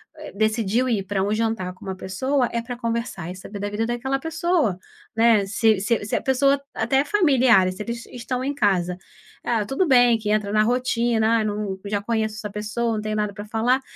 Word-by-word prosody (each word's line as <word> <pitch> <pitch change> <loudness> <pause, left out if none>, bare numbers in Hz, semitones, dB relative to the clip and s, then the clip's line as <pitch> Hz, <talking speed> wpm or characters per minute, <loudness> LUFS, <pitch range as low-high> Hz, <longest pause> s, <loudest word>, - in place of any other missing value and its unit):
eh, 310 -1 -9
decidiu 220 +3 +1
ir 215 -5 0
pra 195 0 -2
um 200 +2 0
jantar 220 -4 -1
com - - -14
uma 190 -1 -4
pessoa, 245 +8 -1
é 235 0 -2
pra 245 +1 -6
conversar 230 -7 -3
e 180 - -6
saber 200 +2 -9
da 205 +1 -3
vida 210 +2 -1
daquela 240 +3 -1
pessoa, 325 - 0 0.4
né. 225 -3 +4
Se 215 +1 +2
se 210 +2 0
se 205 - -2
a - - 0
pessoa 275 +1 +2
até 270 +1 +1
familiares, 260 - +4
se 210 - -4
eles 235 +1 -6
estão 250 +1 -4
em 285 +2 -2
casa 180 -7 +1 0.5
ah, 225 -3 0
tudo 270 - 0
bem 245 -5 +5
que 215 -1 -4
entra 210 -1 0
na 215 0 +4
rotina, 230 -1 +1
ah, - - +1
eu - - -1
não 205 -2 -3
já 205 0 -1
conheço 220 0 -1
essa 215 -1 -6
pessoa, 215 +3 -2
não 215 - -2
tenho 215 0 -3
nada 210 -1 -1
pra 205 0 -7
falar, 230 +5 +1
225 Hz, 215 wpm, -23 LUFS, 205-245 Hz, 0.5 s, bem